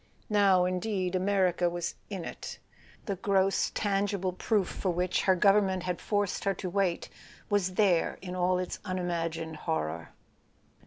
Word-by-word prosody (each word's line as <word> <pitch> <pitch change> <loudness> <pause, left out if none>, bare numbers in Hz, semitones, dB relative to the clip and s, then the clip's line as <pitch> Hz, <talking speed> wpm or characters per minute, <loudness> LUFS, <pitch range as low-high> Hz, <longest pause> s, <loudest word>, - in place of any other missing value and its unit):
Now, 195 -3 +5
indeed, 185 0 -1
America 185 -2 +2
was 175 0 -3 0.2
"in 190 -5 -5
it": - - -7 0.5
the 200 -2 -2
gross 195 -1 +2
tangible 195 -2 0
proof 200 0 +1
for 190 - -3
which 180 +1 0
her 190 - +5
government 195 -1 +3
had 180 -1 -3
forced 205 -2 -1
her 195 -1 +1
to 180 0 -5
wait 190 -3 0 0.4
was 190 -3 +1
there 185 -5 +2
in 185 -1 -6
all 180 0 +2
its 180 -1 -3
unimagined 165 -4 -3
horror. 80 - -3
185 Hz, 145 wpm, -29 LUFS, 175-200 Hz, 0.5 s, Now